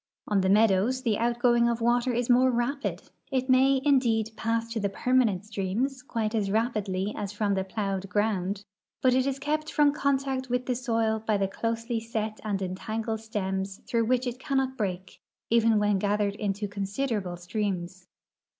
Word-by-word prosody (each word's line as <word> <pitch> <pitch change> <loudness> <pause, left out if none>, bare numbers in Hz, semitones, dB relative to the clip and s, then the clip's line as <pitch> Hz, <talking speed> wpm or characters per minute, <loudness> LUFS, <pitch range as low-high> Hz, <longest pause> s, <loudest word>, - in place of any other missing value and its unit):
On 205 -2 +2
the 190 - +1
meadows 215 +5 +3
the 220 -5 +1
outgoing 240 0 +3
of 235 - 0
the 230 - -5
water 240 +2 +2
is 240 0 -1
more 255 +1 +5
rapid; 255 +4 -1 0.3
it 260 0 +1
may, 265 +1 +5
indeed, 230 -6 +3
pass 230 +1 -1
to 225 - -1
the 200 -1 0
i)ermanent 220 -2 +1
streams 220 +6 -2
quite 225 -4 -2
as 210 -3 0
ra})idly 210 -3 -1
as 200 -1 -4
from 210 -1 0
the 190 -1 0
plowed 195 -1 -3
ground, 200 -1 -1 0.4
but 255 -1 +5
it 260 +1 +2
is 275 -1 -1
kept 305 +2 -2
from 295 -2 +4
contact 270 -2 0
with 250 +1 0
the 255 - 0
soil 225 -3 0
hy 215 -2 +3
tlie 195 -1 -1
closely 230 +1 -2
set 220 -1 -4
and 200 -3 -2
entangled 220 +4 -3
stems 195 -3 -3
through 230 -2 +1
which 250 +2 +1
it 245 0 -4
cannot 265 -1 0
break, 190 -5 -4 0.3
even 230 -1 +4
when 205 -1 +2
gathered 205 0 +1
into 205 0 -2
considerable 200 -1 -2
streams. 185 -1 -4
225 Hz, 175 wpm, -27 LUFS, 200-250 Hz, 0.4 s, more